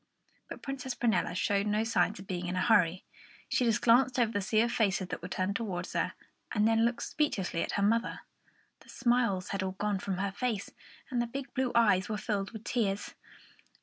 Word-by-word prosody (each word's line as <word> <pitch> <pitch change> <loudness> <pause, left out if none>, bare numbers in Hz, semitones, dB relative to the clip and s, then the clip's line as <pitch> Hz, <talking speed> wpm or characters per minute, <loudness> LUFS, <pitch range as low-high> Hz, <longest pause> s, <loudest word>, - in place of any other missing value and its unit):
But - - -8
Princess 265 -2 -4
Prunella 215 -8 +1
showed 200 +2 +1
no 210 +1 +1
signs 225 -6 +1
of 190 - -10
being 180 -2 -3
in 180 - -2
a 185 - 0
hurry. 185 -5 +3 0.4
She 250 - +1
just 230 -1 +2
glanced 250 +2 +5
over 235 -3 +3
the 205 - -1
sea 215 +3 +2
of 235 +1 +1
faces 195 -5 +1
that - - -4
were 180 - -5
turned 185 +2 -1
towards 185 -6 -3
her, - - 0 0.4
and 210 -1 +3
then 225 0 +3
looked 235 0 -1
speechlessly 195 - -1
at - - -2
her 200 - +1
mother. 230 +3 +1 0.6
The - - -20
smiles 235 -7 +1
had 195 - -2
all 190 0 -2
gone 205 0 -1
from 190 -1 -3
her 195 +1 -1
face, 220 -1 -2 0.4
and 245 -2 +1
the 240 - -1
big 275 +3 -6
blue 260 -2 0
eyes 205 -5 +4
were 215 - -1
filled 205 -2 -2
with 220 -2 -9
tears. 205 -5 -1
210 Hz, 210 wpm, -31 LUFS, 190-235 Hz, 0.6 s, glanced